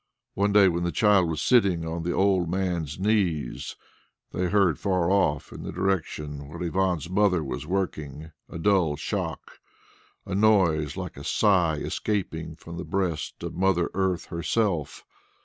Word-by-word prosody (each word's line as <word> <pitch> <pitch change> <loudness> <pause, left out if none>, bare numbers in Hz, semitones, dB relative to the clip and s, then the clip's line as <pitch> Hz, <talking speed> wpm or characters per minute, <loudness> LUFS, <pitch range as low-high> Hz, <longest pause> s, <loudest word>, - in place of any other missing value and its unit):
One 100 +1 +1
day 100 -1 +6
when 85 -1 0
the 85 - 0
child 100 -5 +3
was 80 -1 -2
sitting 95 -9 +3
on 80 +1 -3
the 85 +1 -2
old 95 -3 +2
miner's 85 -5 -2
knees, 95 - 0 0.6
they 90 - -1
heard 95 -3 +2
far 90 -3 +1
off 75 -8 +1
in - - -8
the - - -5
direction 75 -6 -2
where 80 +4 -9
Ivan's 90 -2 0
mother 95 -2 +2
was 70 - -5
working 80 -5 -3 0.2
a - - -7
dull 85 -4 +2
shock 75 - -5 0.7
a 95 - -5
noise 95 -8 +3
like - - -6
a 70 - -8
sigh 90 -2 +3
escaping 80 -1 -3
from 85 +1 -10
the 85 - -4
breast 90 -6 -3
of - - -4
Mother 90 -1 +1
Earth 95 -2 0
herself. 85 -1 -1
90 Hz, 155 wpm, -26 LUFS, 80-95 Hz, 0.7 s, day